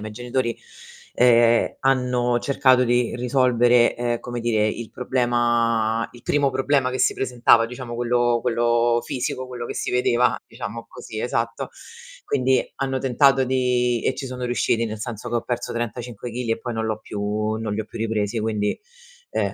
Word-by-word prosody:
miei 110 - -6
genitori, 120 +2 -2 0.6
ehm, 120 -1 +4
hanno 125 -2 +1
cercato 130 -2 +3
di 120 -1 +1
risolvere, 125 -1 +3
ehm, 120 -1 -1
come 120 -1 -6
dire, 110 -2 +1
il 110 +1 -4
problema 120 -3 +1
il 120 - -16
primo 145 -1 +2
problema 135 0 +1
che 130 - -3
si 125 - +3
presentava, 120 -2 +3
diciamo 120 0 -7
quello 120 0 +1
quello 120 -1 +2
fisico, 130 -1 -3
quello 125 -1 -6
che - - -5
si - - -3
vedeva, 125 -1 +2
diciamo 115 +3 -7
così 110 -3 -8
esatto. 115 -1 -2 0.6
Quindi, 130 -2 +2 0.2
hanno 135 -1 -1
tentato 135 +1 +3
di 125 -2 +1
e - - +1
ci 135 - -5
sono 125 -1 -7
riusciti, 120 -1 +1
nel 110 -1 -5
senso 110 -1 -6
che 120 - -1
ho 115 - -1
perso 120 -1 -3
35 120 0 -5
chili, 120 -1 -3
e 115 - 0
poi 120 +1 -5
non 110 0 -2
l'ho 110 -1 -2
più 105 +1 -3
non 110 -2 -3
li 105 - -3
ho - - -14
più - - -10
ripresi 110 0 -1
quindi, 105 -1 -1 0.5
uhm - - -1
120 Hz, 170 wpm, -23 LUFS, 115-125 Hz, 0.6 s, ehm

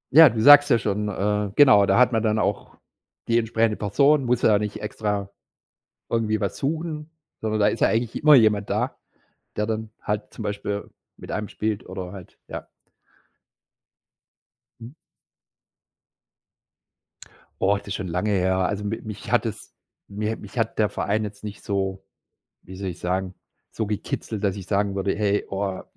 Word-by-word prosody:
Ja, 160 -2 +10
du 115 -1 -4
sagst 145 +1 +9
ja 120 - +5
schon, 105 -1 -2
äh, 105 +1 -1
genau, 125 -9 +6
da - - +3
hat 125 0 +5
man 115 -2 +1
dann 110 -1 +1
auch - - -2 0.5
die 115 0 +3
entsprechende 115 -1 0
Person, 140 +7 +3
muss 120 0 +1
ja 105 -2 +5
nicht 105 0 -4
extra 105 -2 -3 0.8
irgendwie 110 -2 0
was 100 - -2
suchen, 155 +1 -3 0.3
sondern 110 -1 -1
da 105 - +5
ist 105 - -1
ja - - +4
eigentlich 115 +3 -1
immer 150 -1 +8
jemand 110 -4 +3
da, - - -1 0.6
der 105 0 0
dann 110 -1 -3
halt 105 0 -3
zum - - -9
Beispiel 100 0 -4 0.3
mit - - -9
einem 105 -1 -3
spielt 110 +1 -3
oder 90 -1 -6
halt 95 -3 -12
ja. - - -7 2.1
Mhm. 115 +5 -10 2.7
Oh, 100 +1 +3
das 100 - -12
ist 95 - -3
schon 95 - -4
lange 90 +5 -1
her. 95 -1 +1
Also 100 +3 -1
m 105 - -2 0.2
mich 105 -1 -7
hat - - +3
es - - -6 0.3
mi 105 +2 -3
mich 105 +2 -12
hat 115 -1 -1
der 105 -1 +3
Verein 105 +2 -1
jetzt 105 0 -8
nicht 105 -1 -8
so, 95 -1 -2 0.6
wie 95 - -11
soll 95 0 -4
ich 90 - -8
sagen, 95 +1 -2 0.4
so 110 - -3
gekitzelt, 105 +1 -4
dass 100 -1 +1
ich 95 -2 -8
sagen 100 0 0
würde: 95 0 -1
„Hey, 105 -1 0
oh, 95 -1 -3
105 Hz, 170 wpm, -24 LUFS, 100-110 Hz, 2.7 s, Ja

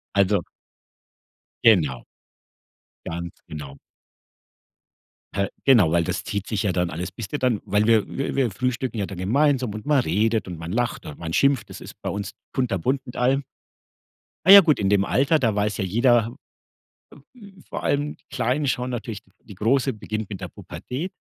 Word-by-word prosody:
Also 100 -1 +3 1.2
Genau. 80 - +4 1.0
Ganz 85 +1 -5
genau. 70 -3 -8 1.6
Hä, 100 0 +1 0.2
genau, 115 - +6
weil 85 - +3
das - - -3
zieht 100 -2 -4
sich 110 -3 -1
ja 100 - +1
dann 90 -1 0
alles 90 +3 -5
bist 105 +4 -8
du 145 - -1
dann 125 -6 +1
weil 105 +1 +1
wir 110 -2 +4
wir 135 - -3
wir 130 -4 +1
frühstücken 125 +2 -2
ja 100 - -1
dann 95 -3 -8
gemeinsam 130 +3 +2
und 110 +5 -7
man 150 -2 +4
redet 110 +2 0
und 85 -3 -6
man 85 +2 -6
lacht 120 +1 -1
und 75 - -8
man 80 -1 -4
schimpft. 140 +1 +2
Das - - -9
ist - - -10
bei - - -3
uns 100 0 -4 0.2
kunterbunt 125 +1 0
mit 120 - -9
allem. 135 +3 +2 1.0
Na 190 - +10
ja 200 - +13
gut, 155 -5 +2
in 100 - +1
dem 100 -1 +3
Alter, 140 +8 +2
da 115 -7 +1
weiß 105 0 0
ja 95 - -1
jeder 120 +3 +2 1.0
äh, - - -17
w 195 -3 -14
vor - - -5
allem 145 +1 0
die - - -35
Kleinen 135 +5 0
schauen 125 0 -1
natürlich 115 -4 -5 0.2
die 105 - -12
Große 130 +7 +1
beginnt 110 0 -5
mit 95 - -6
der 90 - -5
Pubertät, 155 - -6
110 Hz, 180 wpm, -23 LUFS, 95-130 Hz, 1.6 s, ja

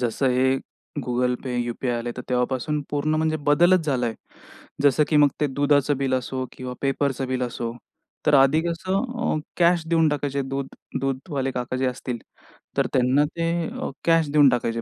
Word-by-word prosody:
जसं 125 +2 0
हे 130 +1 +3 0.5
Google 125 0 +1
Pay, 130 - -3
UPI 120 +1 -2
आले 120 +1 -4
तर 125 - -5
तेव्हापासून 130 +4 0
पूर्ण 150 +1 0
म्हणजे 155 0 +1
बदलच 175 +3 +4
झालाय. 125 -5 0 0.7
जसं 145 +1 +4
की 150 - +2
मग 145 -1 +6
ते 150 - +3
दुधाचं 145 0 +2
बिल 135 -1 0
असो 130 +1 -2
किंवा 125 -1 -6
पेपरच 135 -1 0
बिल 130 -1 -1
असो. 120 -1 -3 0.5
तर 150 - +5
आधी 135 +3 +5
कसं 185 +6 -1 0.2
अ, 155 - +1 0.2
कॅश 170 -1 +4
देऊन 165 -1 +3
टाकायचे 140 -1 -1
दूध 135 0 -3 0.3
दूधवाले 135 +1 -2
काका 125 0 -3
जे 130 0 0
असतील 125 -1 -3 0.6
तर - - +2
त्यांना 130 +3 +3
ते 165 +2 -2 0.2
अ, - - -5 0.2
कॅश 165 -3 +3
देऊन 145 -2 +6
टाकायचे. 115 -2 -1
135 Hz, 170 wpm, -24 LUFS, 125-150 Hz, 0.7 s, मग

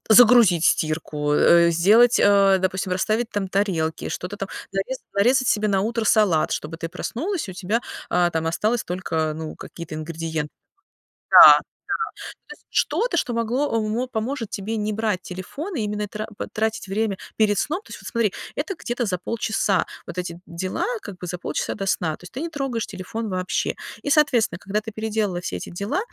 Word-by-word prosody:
загрузить 220 -7 +7
стирку, 155 -2 +1
э, 170 +3 +5
сделать, 215 +9 +5
а, 200 -1 +5
допустим, 185 0 -1
расставить 215 +5 0
там 200 -2 -2
тарелки, 180 -5 -1
что-то 180 +3 -5
там 195 - -4 0.2
нарезать 205 +7 -3
нарезать 250 +6 +3
себе 215 0 +2
на 195 -2 +2
утро 230 +1 -1
салат, 200 -7 +3
чтобы 160 +2 -4
ты 165 - -4
проснулась 320 - -3
и - - -4
у - - -9
тебя, 200 +6 -1 0.3
а, 175 0 +2
там 160 -1 -2
осталось 215 +8 0
только, 160 -4 -2
ну, 160 -1 -6
какие-то 170 -2 -9
ингредиен 160 -1 -4 0.8
Да-да, - - +12 0.8
то - - -8 0.2
есть, - - -23
что-то, 475 -7 +1
что 250 -6 0
могло 230 +4 0
э, - - +3
вот, 245 +4 -2
поможет 225 0 -3
тебе 215 +3 -3
не 210 0 -1
брать 215 -3 -1
телефон, 185 - -7
а - - -1
именно 210 -1 -2
тра 215 +2 -5
вот, - - -3
тратить 220 -1 -1
время 200 0 -1 0.2
перед 210 -2 +3
сном. 355 +6 -1
То - - -19
есть, - - -8
вот - - -9
смотри, 230 -5 +1 0.2
это 395 - -2
где-то 240 0 -2
за 185 -4 -1
полчаса 210 0 0 0.2
вот - - -8
эти 175 -1 -4
дела, 185 - -3 0.2
как 200 - -8
бы 180 - -7
за 180 +1 -4
полчаса - - -3
до 195 - -4
сна. 160 -4 0
То - - -21
есть 180 - -11
ты 260 - -5
не 335 - -3
трогаешь 270 -7 -2
телефон 220 +4 -5
вообще. 185 -2 -1 0.3
И, - - 0
соответственно, 255 - +3
когда 200 +2 -1
ты 220 +1 -8
переделала 215 -4 -1
все 135 - -4
эти - - -8
дела, 200 - -2
205 Hz, 190 wpm, -23 LUFS, 180-230 Hz, 0.8 s, Да-да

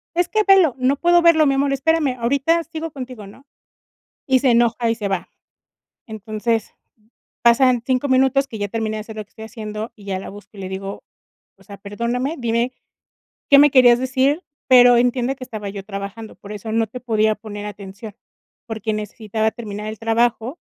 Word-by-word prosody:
"Es 350 0 +1
que 430 -1 +1
velo". 375 -9 +5
"No 255 +2 +2
puedo 345 +4 +3
verlo 335 -2 +5
mi 275 - +3
amor, 275 0 +1
espérame, 280 -1 +1
ahorita 280 +8 +1
sigo 330 0 -6
contigo", 255 -6 -8
¿no? 265 +8 -16 0.8
Y 260 -1 +4
se 260 -1 +3
enoja 235 0 +2
y 230 - +1
se 210 -3 -4
va. 190 -2 -3 0.8
Entonces, 220 +1 -3 0.7
pasan 245 +1 +4
5 260 +1 0
minutos 265 +1 +3
que 225 - -8
ya 205 - -1
terminé 220 0 -3
de - - -4
hacer 220 +1 -10
lo 215 - -4
que - - -43
estoy 220 - -11
haciendo, 215 -1 -7
y 205 - -16
ya 190 -1 -3
la 190 - -8
busco, 205 +1 -13
y - - -9
le 185 - -6
digo: 195 +1 -6 0.5
"O - - -21
sea, 200 -1 -11
perdóname, 235 +8 -3
dime 235 +1 -1 0.8
qué 280 - +8
me 290 +1 +7
querías 245 -3 +6
decir, 265 +5 +1 0.3
pero 245 -2 +7
entiende 245 +2 +1
que 255 - -8
estaba 215 -5 -7
yo 195 -1 -7
trabajando, 200 +2 -7
por 205 - -13
eso 210 +1 -6
no 225 0 +1
te 250 - -8
podía 220 -3 +1
poner 205 -1 -8
atención, 205 +1 -9 0.5
porque 220 -1 -3
necesitaba 215 +1 -2
terminar 210 -2 -7
el 215 0 -7
trabajo, 230 - 0
235 Hz, 190 wpm, -20 LUFS, 215-265 Hz, 0.8 s, qué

